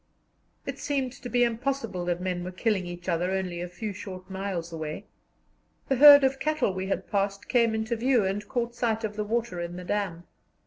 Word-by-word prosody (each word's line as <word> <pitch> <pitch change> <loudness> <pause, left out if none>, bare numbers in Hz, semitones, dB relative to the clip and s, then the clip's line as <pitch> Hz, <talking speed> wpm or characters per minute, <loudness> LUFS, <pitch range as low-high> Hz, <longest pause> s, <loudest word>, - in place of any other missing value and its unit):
It - - -5
seemed 270 -3 -1
to 265 -2 -8
be 245 0 +3
impossible 235 -5 -1
that 175 0 0
men 180 -1 -2
were 180 - -4
killing 190 -1 0
each 175 0 -8
other 175 0 +1
only 185 -2 -2
a 175 - -4
few 205 +4 -5
short 185 -1 -9
miles 190 -3 -4
away. 155 -1 -5 0.8
The 270 - +2
herd 285 +1 +10
of 270 0 +2
cattle 305 -10 +1
we 190 +1 -3
had 195 - -2
passed 200 0 -1
came 230 -3 +3
into 220 +2 -1
view, 240 -2 +2
and 205 +2 -2
caught 240 -1 -1
sight 230 -2 -1
of 210 -1 -3
the 210 - -1
water 225 -3 -2
in 170 0 -5
the 180 - -7
dam. 190 -4 -2
205 Hz, 205 wpm, -27 LUFS, 180-240 Hz, 0.8 s, herd